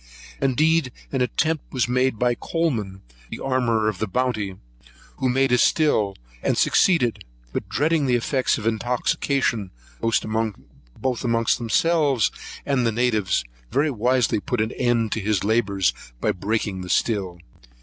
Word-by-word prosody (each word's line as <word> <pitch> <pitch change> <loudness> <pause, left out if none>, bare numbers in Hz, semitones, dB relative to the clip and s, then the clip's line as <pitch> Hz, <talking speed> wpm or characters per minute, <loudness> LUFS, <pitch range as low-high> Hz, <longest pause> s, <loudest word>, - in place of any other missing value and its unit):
Indeed 150 +2 +2 0.2
an 135 - -1
attempt 155 +5 0
was 125 -3 0
made 125 -1 +1
by 125 +2 +2
Coleman, 115 - -2 0.3
the - - -6
armourer 120 -5 +1
of 105 -4 -2
the 110 - -1
Bounty, 110 -3 -1 0.6
who 130 - 0
made 135 +1 +2
a 125 - +4
still, 110 -12 +2 0.3
and - - 0
succeeded; 120 - +3 0.3
but, - - -4
dreading 150 0 +1
the 125 - +3
effects 130 +2 +1
of 110 - -6
intoxication, 115 -1 0 0.3
both 115 -1 +1 1.0
amongst 115 -2 +1
themselves 140 +1 +2 0.3
and 135 -3 +1
the 115 - +2
natives, 110 - +1 0.3
very 145 +4 +1
wisely 125 -1 +1
put 125 +3 -3
an 110 +2 0
end 120 -3 0
to - - -1
his 105 -2 0
labours 100 -3 +1 0.3
by - - +1
breaking 100 0 -2
the 90 - -7
still. 95 -3 0
120 Hz, 140 wpm, -23 LUFS, 110-130 Hz, 1.0 s, a